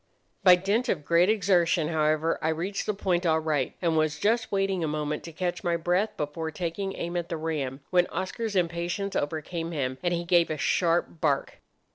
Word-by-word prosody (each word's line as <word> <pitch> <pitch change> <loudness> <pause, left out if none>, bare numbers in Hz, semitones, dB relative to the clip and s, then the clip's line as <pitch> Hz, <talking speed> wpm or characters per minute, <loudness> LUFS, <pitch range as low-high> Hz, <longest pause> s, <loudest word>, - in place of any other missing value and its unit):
"By 180 -1 +9
dint 200 +7 0
of 150 -6 -1
great 170 +4 +4
exertion, 180 -6 +2
however, 155 0 +1
I 160 - +1
reached 175 +5 -2
the 210 - +1
point 185 -3 0
all 160 -2 +3
right, 155 -4 -1
and 165 -2 +2
was 155 -1 +1
just 225 +3 +1
waiting 195 -3 0
a - - 0
moment 150 0 -2
to 165 - -7
catch 175 +2 -3
my 170 -1 +1
breath 180 +5 0
before 150 +2 -3
taking 180 +4 -4
aim 170 +1 -4
at 175 -1 -2
the 165 - -2
ram, 150 -4 -3
when 180 -1 +4
Oscar's 205 +3 -4
impatience 175 +3 -1
overcame 165 +3 -2
him, 130 -3 -2
and 175 -1 0
he 170 0 -1
gave 170 0 +3
a 155 - -2
sharp 170 0 +1
bark. 140 -4 0
170 Hz, 195 wpm, -27 LUFS, 155-185 Hz, -, By